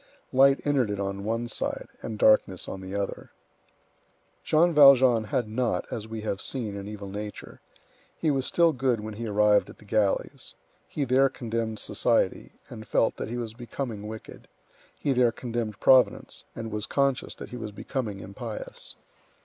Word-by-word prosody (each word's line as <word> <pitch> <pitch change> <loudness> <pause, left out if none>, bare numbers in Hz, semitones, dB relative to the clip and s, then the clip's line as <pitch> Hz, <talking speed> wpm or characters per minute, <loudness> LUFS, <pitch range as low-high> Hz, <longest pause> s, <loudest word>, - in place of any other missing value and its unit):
Light 135 +1 +5
entered 140 -6 +2
it 100 -1 -3
on 100 0 -3
one 115 +2 -1
side, - - -3
and 110 - -5
darkness 105 -4 +3
on 95 - -6
the 95 +1 -6
other. 100 -1 -4 1.1
Jean 170 +2 +3
Valjean 130 -6 +7
had 110 +2 -1
not, 115 +2 -1
as 110 -1 -4
we 110 0 -6
have 100 -2 -3
seen, 115 -7 -3
an 100 0 -6
evil 105 -1 -7
nature. 105 +1 -7 0.6
He 155 - +1
was 135 -2 0
still 170 -2 +4
good 130 -3 +1
when 110 +1 -6
he 115 +2 -5
arrived 105 0 +3
at - - -12
the - - -17
galleys. 100 -1 -1 0.3
He 145 - -2
there 135 +2 +4
condemned 115 -3 -3
society, - - 0
and 110 0 -10
felt 115 - +2
that - - -4
he 120 - -3
was 115 -2 -4
becoming 120 -3 -5
wicked; 110 0 -10 0.5
he 140 - 0
there 125 -2 +4
condemned 115 -3 -4
Providence, 130 -1 +3
and 115 -1 -5
was 105 0 -3
conscious 140 -2 0
that - - -9
he 125 - -7
was 110 -3 -6
becoming 105 -1 -4
impious. 110 +4 -4
115 Hz, 170 wpm, -27 LUFS, 105-130 Hz, 1.1 s, Valjean